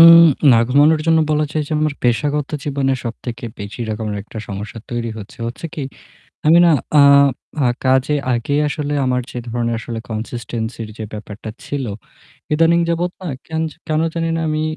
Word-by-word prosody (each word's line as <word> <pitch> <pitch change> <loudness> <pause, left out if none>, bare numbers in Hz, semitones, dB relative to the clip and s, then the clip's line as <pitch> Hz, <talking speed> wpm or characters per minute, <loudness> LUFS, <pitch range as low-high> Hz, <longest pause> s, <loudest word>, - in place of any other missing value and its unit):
উম 165 0 +11 0.4
না - - +6
ঘুমানোর 150 +4 +5
জন্য 160 0 +5
বলা 150 0 +2
যায় 155 - 0
যে - - -4
আমার 155 -2 +1
পেশাগত 140 +5 +1
জীবনে 135 -2 0
সবথেকে 120 0 -6
বেশি 100 +4 -7
এরকম 110 0 -3 0.2
একটা 110 +2 -9
সমস্যা 105 +3 -6
তৈরি 120 -1 -2
হচ্ছে। 105 +2 -11
হচ্ছে 120 +8 -5
কি, 150 - -4 0.7
আমি 165 +2 +7
না 170 - +6 0.3
আ - - +8 0.6
আ - - +4 0.2
কাজে 130 +3 +3 0.2
আগেই 140 +5 0
আসলে 145 0 -2
আমার 125 0 +1
যে - - -7
ধরনের 120 0 -1
আসলে 115 0 -5
consistency 110 +1 -4 0.2
যে 110 - -5
ব্যাপারটা 105 +1 -7 0.2
ছিল 140 -3 -3 0.7
এদানীং 165 +2 +4
যাবত 170 +1 0
না 180 - -4 0.2
কেন 160 0 -2
জা - - -17
কেন 155 0 +1
জানিনা 165 -1 -1
আমি 155 0 0
135 Hz, 170 wpm, -19 LUFS, 115-155 Hz, 0.7 s, উম